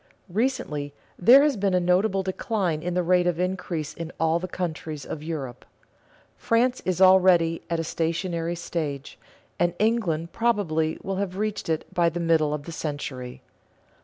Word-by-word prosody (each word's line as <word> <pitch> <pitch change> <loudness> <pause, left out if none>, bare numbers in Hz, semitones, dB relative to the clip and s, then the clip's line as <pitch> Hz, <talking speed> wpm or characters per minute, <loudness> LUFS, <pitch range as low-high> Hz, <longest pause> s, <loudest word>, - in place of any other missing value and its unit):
Recently 170 - -2 0.2
there 250 +10 +8
has 295 -3 +2
been 195 -2 +1
a - - +4
notable 190 +2 +2
decline 190 -4 -1
in 175 +1 -3
the 180 - +1
rate 180 0 +3
of 175 -1 0
increase 180 -4 -2
in 165 0 -7
all 160 +1 +2
the 185 - -4
countries 160 -5 -5
of 150 - -6
Europe. 150 -6 -5 0.7
France 245 +2 +1
is 185 -2 0
already 185 -3 +5
at 170 - 0
the 165 - -1
stationary 170 +1 -2
stage, 150 -5 -5 0.4
and 175 0 +1
England 185 -8 0
probably 175 -9 0
will 195 -1 -3
have 190 -1 -3
reached 210 -4 -2
it 160 -1 -1
by 170 -1 +3
the 170 +1 -5
middle 165 -3 +2
of 150 -1 -3
the 170 - -8
century. 145 -6 -5
175 Hz, 160 wpm, -25 LUFS, 160-190 Hz, 0.7 s, there